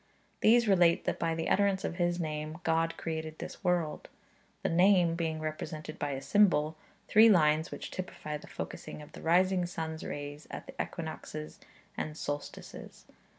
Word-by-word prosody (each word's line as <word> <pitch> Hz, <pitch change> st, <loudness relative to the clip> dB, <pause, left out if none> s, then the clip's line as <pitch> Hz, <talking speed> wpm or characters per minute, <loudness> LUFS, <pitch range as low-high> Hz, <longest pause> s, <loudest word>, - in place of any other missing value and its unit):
These 235 Hz, +1 st, +5 dB
relate 175 Hz, -4 st, +5 dB
that, -, -, -1 dB
by 165 Hz, -1 st, 0 dB
the 165 Hz, 0 st, -2 dB
utterance 200 Hz, -1 st, +2 dB
of 170 Hz, -, -3 dB
His 175 Hz, 0 st, +1 dB
Name, 155 Hz, -1 st, -3 dB
God 165 Hz, 0 st, +1 dB
created 160 Hz, -1 st, -4 dB
this -, -, -8 dB
world; 175 Hz, -4 st, 0 dB, 0.5 s
the -, -, +2 dB
Name 175 Hz, 0 st, +5 dB
being 165 Hz, -2 st, -2 dB
represented 155 Hz, 0 st, -5 dB
by 145 Hz, -2 st, -1 dB
the 135 Hz, -, -5 dB
symbol 160 Hz, -7 st, +3 dB, 0.2 s
/|\, -, -, -34 dB
three 220 Hz, +2 st, +7 dB
lines 155 Hz, -4 st, +4 dB
which -, -, -7 dB
typify 155 Hz, -4 st, -5 dB
the -, -, -14 dB
focusing 150 Hz, -, -7 dB
of 150 Hz, -, -14 dB
the -, -, -11 dB
rising 180 Hz, +2 st, +3 dB
sun's 160 Hz, -2 st, -5 dB
rays 145 Hz, +1 st, -6 dB
at -, -, -7 dB
the -, -, -10 dB
equinoxes 75 Hz, 0 st, -6 dB, 0.4 s
and 155 Hz, 0 st, -4 dB
solstices. 145 Hz, -2 st, -6 dB
165 Hz, 165 wpm, -31 LUFS, 155-180 Hz, 0.5 s, three